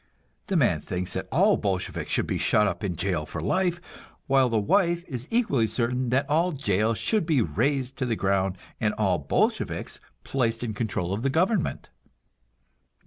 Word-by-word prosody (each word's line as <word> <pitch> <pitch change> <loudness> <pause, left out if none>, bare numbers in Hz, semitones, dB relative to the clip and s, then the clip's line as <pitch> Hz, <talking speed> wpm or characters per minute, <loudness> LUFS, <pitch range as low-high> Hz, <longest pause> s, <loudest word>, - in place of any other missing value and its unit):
The 195 - -1
man 90 - +2
thinks 90 +3 -4
that 95 - -4
all 195 - +4
Bolsheviks 95 -3 -2
should - - +2
be - - -2
shut 105 -1 +3
up 105 - -2
in 95 -4 -2
jail 85 -2 -1
for - - -5
life, 180 -2 0 0.5
while 135 -2 +3
the 115 - +1
wife 170 - +2
is 125 -3 -5
equally 145 - +2
certain 120 +3 -1
that 130 +3 +1
all 165 +4 +2
jails 110 -4 0
should 215 -2 +1
be 155 -5 +3
razed 130 - 0
to 130 - -1
the 115 - 0
ground 95 -1 0 0.2
and 105 -2 0
all 95 -5 +1
Bolsheviks 70 - -1 0.2
placed 115 -3 -1
in 115 -3 -3
control 100 -5 -2
of 105 - -2
the 135 - +1
government. 180 - 0
120 Hz, 175 wpm, -26 LUFS, 100-145 Hz, 0.5 s, all